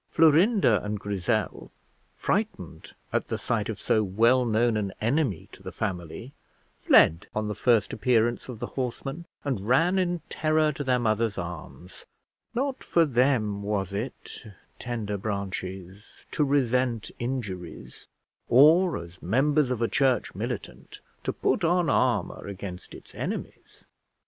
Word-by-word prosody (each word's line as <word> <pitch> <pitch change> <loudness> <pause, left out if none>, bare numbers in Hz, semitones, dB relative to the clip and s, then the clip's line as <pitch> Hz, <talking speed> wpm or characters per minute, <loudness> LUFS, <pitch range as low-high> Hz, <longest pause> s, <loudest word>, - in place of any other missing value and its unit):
Florinda 165 - +4
and 105 0 -3
Grizzel, 100 -3 -2 0.5
frightened - - -3 0.2
at - - 0
the - - -2
sight - - -2
of - - -4
so 110 - +2
well 115 +6 +3
known 115 0 +2
an 100 -2 -1
enemy 120 - 0
to - - -14
the - - -7
family, 95 - -5 0.5
fled 80 +2 +5
on 110 0 -1
the 105 - -2
first 115 +1 +2
appearance 120 +1 +1
of 125 - -6
the - - -4
horseman, 135 +5 -4 0.2
and 115 -8 -3
ran 165 +10 +3
in 175 -2 0
terror 155 0 +1
to 145 0 -5
their 130 -2 +2
mother's 110 -2 0
arms; 85 +1 -8 0.5
not 270 +2 -2
for 170 -1 +3
them 120 -6 +1
was 100 -2 -2
it, 110 +7 -6 0.4
tender 110 -4 -3
branches, 95 -1 -6
to 150 - +1
resent 125 -4 +1
injuries, 105 -9 -6 0.4
or 160 +8 +6
as 85 +1 -10
members 135 - +2
of 120 -2 -1
a - - +2
church 130 -3 +1
militant 65 +2 -6 0.2
to - - -1
put - - 0
on 175 -1 +2
armour - - 0
against 95 -2 -8
its - - -14
enemies. - - -6
115 Hz, 140 wpm, -26 LUFS, 100-140 Hz, 0.5 s, or